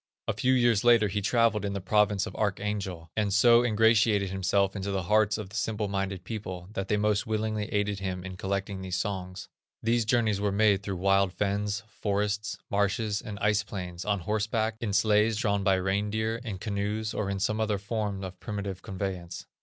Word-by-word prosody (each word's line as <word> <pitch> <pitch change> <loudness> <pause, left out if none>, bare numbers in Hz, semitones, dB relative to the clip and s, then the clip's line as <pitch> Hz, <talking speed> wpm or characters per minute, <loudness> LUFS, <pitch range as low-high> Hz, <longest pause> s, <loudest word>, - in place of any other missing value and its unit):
A 110 - +1
few 125 +5 +2
years 120 -5 +3
later 115 -3 +5
he 105 +2 -1
travelled 115 0 +2
in 100 -1 -2
the 100 - -2
province 105 0 +2
of - - -8
Archangel, 100 -5 -2
and 105 -2 0
so 115 +4 +6
ingratiated 110 -3 +3
himself 95 +1 +1
into 100 0 -3
the 95 -2 -1
hearts 105 +3 +3
of 105 -3 -6
the 105 - -11
simple 110 -2 -1
minded 95 -2 -3
people 95 -3 -6
that 95 -2 -3
they 105 - +1
most 105 0 +1
willingly 110 -1 -1
aided 105 -1 -1
him 95 -2 -4
in 95 -1 -7
collecting 95 +1 -3
these 95 -1 -3
songs. 95 -2 -4 0.4
These 115 0 +2
journeys 110 -3 +2
were 105 -1 +1
made 100 -1 +3
through 100 -1 -4
wild 95 0 +2
fens, 100 0 -1
forests, 105 0 -2
marshes, 100 +1 0
and 105 -2 -7
ice 105 +1 +3
plains, 90 -4 -6
on 100 -2 0
horseback, 110 +3 -1
in 110 -3 -1
sledges 105 +2 +3
drawn 100 -3 0
by 95 -1 +4
the 95 - -2
reindeer, 105 +4 -1
in 110 -6 -4
canoes, 105 +2 -2
or 100 -2 -2
in 100 -1 -2
some 110 +3 0
other 105 -2 +1
forms 100 -1 -3
of 95 0 -9
primitive 100 -3 -5
conveyance. 95 -2 -5
100 Hz, 195 wpm, -28 LUFS, 95-110 Hz, 0.4 s, so